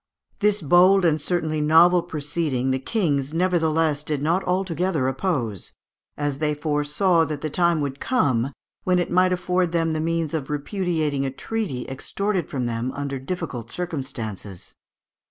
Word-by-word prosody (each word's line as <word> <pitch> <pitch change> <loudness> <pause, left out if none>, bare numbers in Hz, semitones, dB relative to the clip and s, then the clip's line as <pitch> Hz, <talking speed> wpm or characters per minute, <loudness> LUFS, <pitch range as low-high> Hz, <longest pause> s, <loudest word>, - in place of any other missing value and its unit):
This 210 -2 +2
bold 180 +5 +5
and 155 -2 +2
certainly 160 -2 -1
novel 170 +4 +6
proceeding 145 -5 -2
the 130 - 0
kings 145 - -1
nevertheless 165 -4 +2
did 150 -1 -2
not 165 +6 +1
altogether 180 -5 0
oppose, 130 - -2 0.4
as 145 -2 -2
they 150 -1 +1
foresaw 150 +4 +1
that 150 -1 -5
the 155 - -3
time 170 -1 +2
would 140 -1 -3
come 135 - +1 0.3
when 180 -1 +2
it 175 - -1
might 185 +1 +4
afford 180 -1 0
them 165 -1 +1
the 155 - -1
means 165 -1 -1
of 150 -4 -3
repudiating 155 -2 -1
a 135 - -1
treaty 155 - -4
extorted 185 +7 -2
from 130 -4 -2
them 120 +2 -2
under 140 -1 -4
difficult 135 -6 -5
circumstances 130 - -5
(Fig. - - -23
155 Hz, 155 wpm, -23 LUFS, 140-180 Hz, 0.4 s, novel